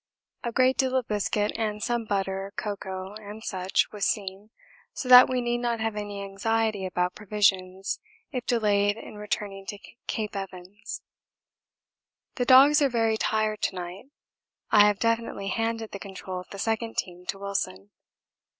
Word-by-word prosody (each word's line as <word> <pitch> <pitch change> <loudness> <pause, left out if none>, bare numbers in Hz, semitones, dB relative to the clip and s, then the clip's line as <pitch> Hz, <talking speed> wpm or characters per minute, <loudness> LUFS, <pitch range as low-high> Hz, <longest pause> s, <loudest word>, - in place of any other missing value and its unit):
A 235 - -2
great 255 +2 +3
deal 260 -1 +2
of 255 -3 +1
biscuit 210 0 0
and 210 -1 -2
some 240 -1 0
butter, 195 -1 -2
cocoa, 190 -2 -4 0.3
&c., 185 -4 -4 0.2
was 210 -2 -5
seen, 195 0 -1 0.4
so 255 - -5
that 250 0 +10
we 255 -1 0
need 240 0 0
not 240 -1 -1
have 220 -1 -1
any 205 -1 -4
anxiety 205 0 0
about 180 0 0
provisions 195 -2 0 0.3
if 250 -3 -3
delayed 205 -3 +2
in 215 - -10
returning 205 -2 -4
to 205 - -5 0.3
Cape 215 -3 -3
Evans. 195 +1 -7 1.3
The 245 - -1
dogs 275 +4 +8
are 280 - +4
very 225 -2 +2
tired 215 -1 0
to 190 - 0
night. 180 +4 -6 0.7
I 210 -1 +8
have 205 -1 +2
definitely 230 -3 0
handed 225 0 -2
the 200 - -6
control 190 -2 -6
of 180 - -11
the 200 - -8
second 225 +2 -2
team 180 0 -4
to 195 0 -2
Wilson. 150 - -3
210 Hz, 155 wpm, -27 LUFS, 195-230 Hz, 1.3 s, that